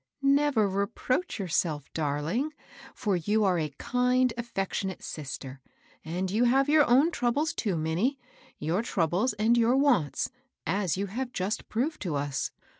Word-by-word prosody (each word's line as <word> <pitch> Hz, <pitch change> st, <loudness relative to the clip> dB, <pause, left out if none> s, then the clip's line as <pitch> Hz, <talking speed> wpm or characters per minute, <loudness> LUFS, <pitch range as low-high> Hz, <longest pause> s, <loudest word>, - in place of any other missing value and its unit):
" -, -, -55 dB, 0.2 s
Never 240 Hz, -8 st, +2 dB
reproach 200 Hz, -, -1 dB
yourself, 160 Hz, -6 st, -1 dB
darling, 160 Hz, -, -1 dB, 0.4 s
for 205 Hz, -3 st, 0 dB
you 205 Hz, +6 st, +1 dB
are 185 Hz, -3 st, +2 dB
a 155 Hz, -1 st, -1 dB
kind, 250 Hz, 0 st, +2 dB
affectionate 195 Hz, -5 st, -3 dB
sister. 135 Hz, -2 st, -7 dB, 0.4 s
Atid 180 Hz, +4 st, -3 dB
you 225 Hz, +4 st, +3 dB
have 265 Hz, +3 st, +4 dB
your 295 Hz, 0 st, +5 dB
troubles, 285 Hz, +3 st, 0 dB
too, 195 Hz, -7 st, -1 dB
Minnie, 170 Hz, -, 0 dB, 0.2 s
— -, -, -27 dB
your 175 Hz, +6 st, +2 dB
troubles 195 Hz, +2 st, 0 dB
and 215 Hz, +3 st, +3 dB
your 235 Hz, +1 st, +4 dB
wants, 245 Hz, -, +2 dB, 0.3 s
as 185 Hz, -1 st, 0 dB
you 200 Hz, -, -1 dB
have 245 Hz, +6 st, -4 dB
just 195 Hz, 0 st, -3 dB
proved 270 Hz, +8 st, -1 dB
to 175 Hz, -7 st, -2 dB
us. 140 Hz, -1 st, -1 dB
205 Hz, 150 wpm, -28 LUFS, 170-250 Hz, 0.4 s, your